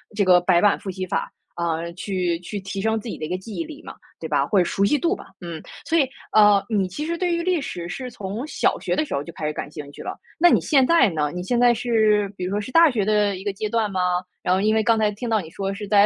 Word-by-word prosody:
这 205 - +2
个 180 -1 +6
白 175 -1 +3
板 205 -1 +4
复 195 - -5
习 185 0 -4
法， - - -2 0.2
嗯， 170 0 -2
去 180 -3 -1
去 200 +4 -6
提 195 0 -5
升 220 +1 +1
自 220 - -9
己 - - -5
的 155 - -4
一 - - -7
个 180 - -1
记 205 +3 -9
忆 - - -2
力 315 -1 -10
嘛， - - -9 0.2
对 160 - -5
吧？ 140 -2 +2
或 200 - 0
者 175 - +3
熟 195 - 0
悉 295 - +3
度 340 +7 +1
吧， - - -11 0.2
嗯。 170 -3 -6 0.2
所 330 - +1
以， 300 - +5 0.3
嗯， 210 -1 +6
你 200 -4 +1
其 295 +12 -5
实 335 +1 -2
对 355 0 0
于 340 - 0
历 360 -3 +1
史 175 -10 -5
是 250 +8 -5
从 210 +4 -5
小 - - +1
学 - - -1
的 310 - +1
时 - - -6
候 140 - -2
就 170 - -9
开 155 - -5
始 150 - -1
感 - - -5
兴 150 -2 -8
趣 - - -10
了， - - -6 0.2
那 350 +2 +7
你 - - +4
现 275 -4 +3
在 335 -10 +5
呢？ 150 -3 -1
你 180 - -4
现 240 +6 0
在 245 -1 +5
是 220 -3 +2
比 180 - -5
如 185 - -3
说 205 - 0
是 210 - -7
大 330 +3 +7
学 215 -5 0
的 210 -1 +2
一 190 - -9
个 205 - 0
阶 210 +2 -3
段 225 -1 0
吗？ 185 -1 -1 0.4
然 180 - +2
后 185 - +2
因 215 +2 +2
为 220 - +2
刚 225 +1 +3
才 215 -1 +3
听 230 +4 -5
到 220 -1 +2
你 165 -5 -8
说 195 +3 -3
是 205 0 -7
在 205 -1 +5
205 Hz, 325 characters per minute, -23 LUFS, 180-235 Hz, 0.4 s, 那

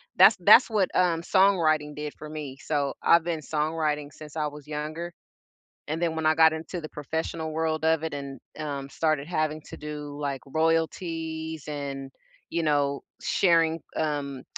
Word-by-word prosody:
That's - - +8
that's - - +8
what, 210 -4 +2
um, 170 -2 +3
songwriting 165 -6 +3
did 150 0 -4
for 155 - -9
me. 150 -4 -6
So, 145 -3 0
I've 170 -1 +5
been 165 -2 -2
songwriting 150 -1 -1
since 155 0 -10
I 150 - 0
was 150 0 -10
younger, 155 +3 -4 0.8
and 155 +2 -3
then 165 -2 0
when 160 - -2
I 155 - +4
got 160 0 +6
into 165 +2 -5
the 155 - -7
professional 160 +2 -4
world 160 0 -1
of 160 0 +3
it 160 - -3
and, 140 -1 -6 0.2
um, 140 -3 -4
started 155 0 0
having 155 -3 -1
to - - -7
do 150 -1 -7
like 140 -2 -2
royalties 160 0 -1
and, 140 -2 -5 0.4
you 170 0 0
know, 145 -2 +1 0.2
sharing, 165 -3 +3 0.2
um, 145 -4 -2
155 Hz, 165 wpm, -27 LUFS, 150-160 Hz, 0.8 s, That's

